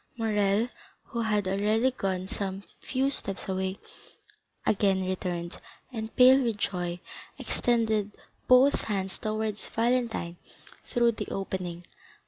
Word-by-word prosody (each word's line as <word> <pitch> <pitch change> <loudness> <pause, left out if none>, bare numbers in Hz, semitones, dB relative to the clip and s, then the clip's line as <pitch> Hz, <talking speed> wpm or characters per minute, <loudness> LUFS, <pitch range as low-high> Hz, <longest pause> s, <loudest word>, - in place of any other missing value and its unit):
Morrel, 210 -1 +2 0.4
who 235 - -4
had 210 -3 +1
already 215 +6 +2
gone 190 -6 -2
some 195 0 -3 0.2
few 270 +1 0
steps 195 -7 0
away, 190 0 -2 0.9
again 195 -2 +2
returned, 180 -2 -3 0.3
and 220 -1 -5
pale 260 +2 +7
with 230 -4 0
joy 175 -3 -2 0.4
extended 220 -4 +1 0.4
both 255 +3 +5
hands 195 -3 -2
towards 215 -1 -3
Valentine 230 -7 0 0.5
through 235 -1 +3
the 210 -2 -5
opening. 180 -3 -4
210 Hz, 110 wpm, -28 LUFS, 190-230 Hz, 0.9 s, pale